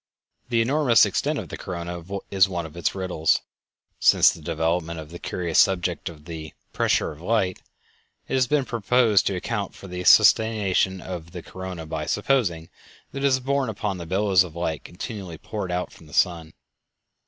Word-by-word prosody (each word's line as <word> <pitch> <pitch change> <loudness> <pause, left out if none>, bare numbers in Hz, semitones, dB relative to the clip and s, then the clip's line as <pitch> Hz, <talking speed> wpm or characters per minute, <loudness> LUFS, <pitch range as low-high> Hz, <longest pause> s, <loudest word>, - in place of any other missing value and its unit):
The 115 -2 +2
enormous 130 -2 +4
extent - - -1
of - - -6
the - - -6
corona 85 -1 -6 0.3
is 95 -1 +4
one 85 -3 -3
of 80 - -11
its 85 +2 -1
riddles. 90 -4 +1 0.6
Since - - +6
the 85 - -11
development 80 +1 -1
of 80 0 -10
the 85 - -8
curious 85 -3 -1
subject 95 -3 +2
of 75 -3 -14
the 80 -2 -8 0.2
"pressure - - +1
of 75 +1 -12
light" 95 -2 0 0.7
it - - -5
has 130 -2 +3
been 145 0 +1
proposed 115 -2 +2
to 95 - 0
account 100 +2 -3
for 95 - -11
the 90 0 -5
sustentation 100 -4 +4
of 85 -3 -7
the 90 -2 -7
corona 95 -3 -7
by 80 -1 -4
supposing 105 -8 0 0.4
that 140 - -5
it 140 - -1
is 130 -1 +2
borne 135 -1 0
upon 105 -3 -3
the 85 - -7
billows 95 0 +3
of 85 -3 -10
light 85 -2 -3
continually 90 -2 -7
poured 100 -1 -5
out 90 +1 -3
from 80 - -16
the 75 - -10
sun. 85 -3 +1
90 Hz, 180 wpm, -24 LUFS, 85-105 Hz, 0.7 s, Since